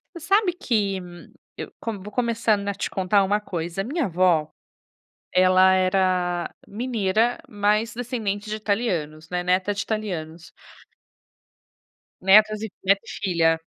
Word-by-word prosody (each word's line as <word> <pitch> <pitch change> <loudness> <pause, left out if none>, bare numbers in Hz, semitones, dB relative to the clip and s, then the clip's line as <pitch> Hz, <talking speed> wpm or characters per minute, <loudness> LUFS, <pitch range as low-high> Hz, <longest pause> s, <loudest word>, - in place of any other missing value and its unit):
Você 340 - -8
sabe 395 0 +3
que, 210 - -1 0.6
eu - - -7
com 225 -3 -4
vou 205 +3 -10
começando 230 -4 0
a 200 - -1
te - - -4
contar 195 +1 +2
uma 205 +2 +1
coisa, 175 -1 -4
a - - -8
minha 295 - -1
avó, 170 -4 +2 0.8
ela 185 +1 +5
era 185 -2 +1 0.2
mineira, 225 0 0
mas 210 +2 0
descendente 220 -4 -3
de 215 - -2
italianos, 180 -8 -2
né, 180 0 -1
neta 185 +3 +1
de 200 - -2
italianos. 175 -7 -5 1.7
Netas 215 +2 +5
e 220 - -4
neta 195 +1 +3
e - - -11
filha. 165 -4 +1
200 Hz, 135 wpm, -24 LUFS, 185-220 Hz, 1.7 s, ela